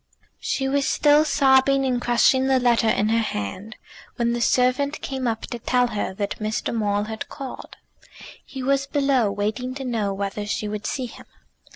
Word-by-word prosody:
She 270 - -1
was 275 0 +1
still 295 0 +4
sobbing 270 -2 +3
and 250 -2 0
crushing 260 +2 +3
the 265 -1 +3
letter 235 -2 +3
in 210 0 +1
her 225 +1 +2
hand 195 - -5 0.4
when 235 0 0
the 240 - -2
servant 255 +5 +2
came 265 -2 -3
up 225 -1 -2
to 240 - -6
tell 250 +1 +1
her 210 -4 -3
that 200 0 -3
Mr. 215 +1 -2
Maule 205 -2 0
had 220 +1 -6
called. 270 -3 -8 0.7
He 265 -2 -8
was 275 +1 +1
below, 275 -7 +1
waiting 215 +6 -3
to 270 -1 -6
know 220 -5 -1
whether 200 +1 -4
she 210 0 -2
would 210 0 -4
see 260 -3 -2
him. 240 - -12
245 Hz, 180 wpm, -23 LUFS, 215-270 Hz, 0.7 s, still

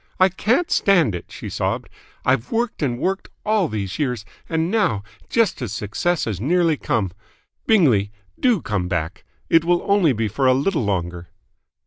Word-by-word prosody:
"I 185 +1 +6
can't 235 - 0
stand 175 - +3
it!" 90 - -5
she - - -8
sobbed. - - -2 0.4
"I've 130 -2 +1
worked 230 -3 -1
and 125 -5 0
worked 190 +8 -2 0.2
all 215 -4 +2
these 100 -4 -4
years, 125 -7 -1 0.2
and 165 +1 0
now, 160 - +1 0.3
just 225 -10 +1
as 115 -5 -3
success 105 - -1
has 105 -5 -3
nearly 165 +4 +2
come 105 -9 -1 0.6
Bingley, 125 - +4 0.3
do 240 -9 +2
come 100 -6 -1
back! 80 -3 -3 0.2
It 165 -1 +4
will 175 +1 +2
only 200 -6 +4
be 110 -1 -1
for 130 +6 0
a 130 - +5
little 150 +1 0
longer." 90 -3 -2
135 Hz, 165 wpm, -21 LUFS, -, 0.6 s, I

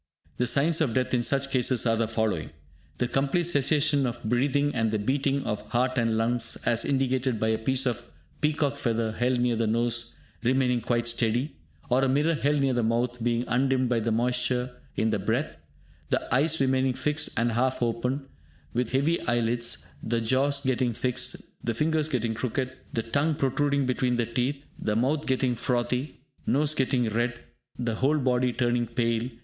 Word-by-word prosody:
The 125 - +1
signs 150 +6 +2
of 130 -8 +1
death 130 0 0
in 125 - +3
such 135 +2 0
cases 130 -2 +1
are 115 -1 +3
the 115 0 0
following. 110 -8 -1 0.5
The 125 - 0
complete 135 +7 +1
cessation 145 -3 +2
of 120 0 -5
breathing 140 +5 +1
and 115 -2 +1
the 110 - 0
beating 135 +5 0
of 105 -4 -2
heart 125 +2 +1
and 115 -1 +1
lungs, 115 +1 0
as 115 -1 +2
indicated 130 -3 0
by 110 - +1
a 110 - +1
piece 130 +3 0
of 120 -1 -2 0.3
peacock 150 -2 +1
feather 115 -3 0
held 125 +2 0
near 120 -1 +2
the 115 0 0
nose 120 +1 0 0.3
remaining 125 0 +2
quite 120 +1 0
steady, 120 +4 0 0.3
or 125 +2 +2
a 135 - +2
mirror 150 +5 +2
held 145 -1 +1
near 135 -1 +2
the 120 - +1
mouth 120 +2 0
being 120 0 +1
undimmed 130 0 +1
by 120 -2 +2
the 115 +1 -1
moisture 125 +2 0 0.2
in 110 0 +1
the 105 - 0
breath; 115 +10 -1 0.5
the - - -1
eyes 150 +5 +2
remaining 130 -1 +2
fixed 150 +4 -1
and 115 +1 +2
half 125 +2 0
open, 125 +4 -1 0.5
with 125 0 -1
heavy 145 +6 +2
eye 120 0 +2
lids; 115 -10 -2 0.2
the 115 +1 -1
jaws 135 +5 +1
getting 125 -2 +1
fixed; 125 +2 -2 0.3
the 115 -1 -1
fingers 155 +3 +1
getting 120 -6 -1
crooked; 130 +3 -3 0.2
the 115 - -1
tongue 145 +7 +1
protruding 140 +1 +1
between 125 -1 +1
the 120 -1 +1
teeth; 130 +5 -2
the 105 - -1
mouth 140 +7 0
getting 130 -1 +1
frothy; 125 +4 -1 0.3
nose 150 +2 +2
getting 130 -4 +1
red; 120 +2 -1 0.4
the 120 -2 -1
whole 135 +7 +2
body 125 -2 +1
turning 120 -1 0
pale. 115 0 0
125 Hz, 180 wpm, -27 LUFS, 115-135 Hz, 0.5 s, in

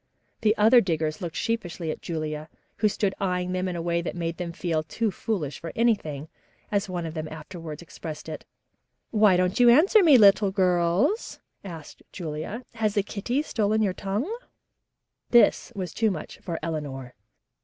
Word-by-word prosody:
The 215 0 +3
other 225 +4 +6
diggers 160 -5 -1
looked 170 -3 -5
sheepishly 175 -8 -2
at - - -7
Julia, 155 -2 -4 0.3
who 215 - +3
stood 200 -1 0
eyeing 180 -1 -1
them 185 0 -1
in 180 - -3
a 170 - -3
way 170 0 0
that 170 - -4
made 170 -1 -3
them 175 -2 -4
feel 165 -2 -1
"too 215 +7 -2
foolish 170 -8 -3
for 165 - -6
anything," 160 -11 0 0.4
as 205 -1 0
one 175 -2 -3
of 160 - -5
them 155 -1 -4
afterwards 160 0 -8
expressed 155 -2 -8
it. 155 - -6 0.7
"Why 210 -4 +5
don't 185 +5 +1
you 245 -1 +7
answer 355 - +6
me, 310 -7 +7
little 200 -2 +6
girls?" 185 - +1 0.2
asked 165 -6 -9
Julia. 170 +7 -5
"Has 220 -3 -1
the 205 - +2
kitty 240 +8 -2
stolen 220 -5 +1
your 195 -3 +1
tongue?" 205 - -3 0.9
This 240 - +4
was 185 -4 -4
too 225 -1 +2
much 165 -6 -6
for 170 -3 -4
Eleanor. 140 -6 -4
180 Hz, 170 wpm, -26 LUFS, 160-215 Hz, 0.9 s, you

